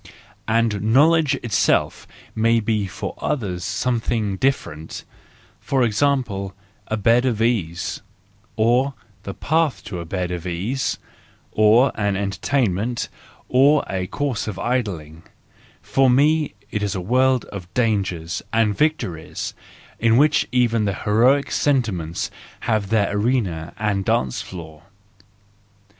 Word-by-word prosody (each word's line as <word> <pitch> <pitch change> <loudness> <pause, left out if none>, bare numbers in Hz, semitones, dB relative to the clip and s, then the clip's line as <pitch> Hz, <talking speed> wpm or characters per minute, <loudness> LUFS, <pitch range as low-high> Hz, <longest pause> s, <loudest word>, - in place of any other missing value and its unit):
—And 115 -3 +1
knowledge 145 +6 +4
itself 110 -5 +1 0.3
may 115 +1 +3
be 105 -2 0
for 90 - -5
others 95 -11 -2
something 110 0 -1
different; 95 - -2 0.6
for 135 -2 0
example, 105 -5 0 0.3
a 110 - -1
bed 115 +4 +3
of 120 -5 0
ease, 100 -8 -1 0.5
or 120 +5 +2 0.3
the 100 -1 -7
path 155 -10 0
to 100 -4 -6
a 85 - -6
bed 90 +1 -3
of 90 0 -4
ease, 105 +11 -2 0.5
or 110 +5 +5
an 100 -2 -1
entertainment, 105 +2 -1 0.4
or 140 +4 +4
a 95 -1 -3
course 140 0 -2
of 105 -4 -4
idling,—for 105 - -3
me 150 0 +3 0.2
it 105 - -2
is 100 -2 -1
a - - -2
world 130 +6 +2
of 90 -3 -8
dangers 95 -8 0
and 110 -2 +2
victories, 115 - -2 0.5
in 115 0 +4
which 150 +2 +3
even 115 -3 +2
the 100 -2 -1
heroic 125 +9 +2
sentiments 105 - 0 0.3
have 110 -4 0
their 105 -2 +1
arena 105 -8 0
and 100 -2 0
dancing 65 -1 0
floor. 80 -4 -10
110 Hz, 120 wpm, -22 LUFS, 95-125 Hz, 0.6 s, or